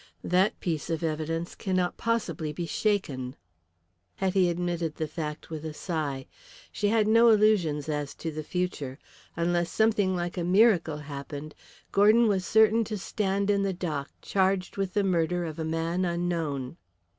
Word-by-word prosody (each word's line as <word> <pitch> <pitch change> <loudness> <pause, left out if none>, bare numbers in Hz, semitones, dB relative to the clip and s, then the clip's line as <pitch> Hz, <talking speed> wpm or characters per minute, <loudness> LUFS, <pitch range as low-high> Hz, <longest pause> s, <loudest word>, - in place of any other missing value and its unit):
That 185 +3 +2
piece 165 -3 -2
of 165 0 -2
evidence 165 +2 -2
cannot 185 -3 -1
possibly 170 -10 -1
be 170 +3 -4
shaken." 150 - -1 0.8
Hetty 190 -1 +2
admitted 170 -2 -2
the 155 - -2
fact 155 0 -6
with 155 -1 -5
a 155 -1 -5
sigh. 150 -7 -3 0.5
She 205 - -1
had 215 0 +3
no 230 +2 +6
illusions 205 -9 +3
as 150 -2 -3
to 165 - -4
the 155 0 -5
future. 155 -5 -3 0.4
Unless 175 0 0
something 210 -4 +2
like 175 +1 -3
a - - -1
miracle 180 -4 +4
happened 145 +1 -7 0.4
Gordon 215 +4 +5
was 190 -3 0
certain 220 +1 +5
to 215 0 -4
stand 200 +1 0
in 200 -1 +2
the 195 -1 0
dock 155 -6 -3
charged 190 -1 +1
with 195 -2 -3
the 205 - +3
murder 175 -1 +1
of 160 0 -6
a - - -1
man 165 +3 -1
unknown. 170 -6 -2
175 Hz, 155 wpm, -28 LUFS, 155-195 Hz, 0.8 s, no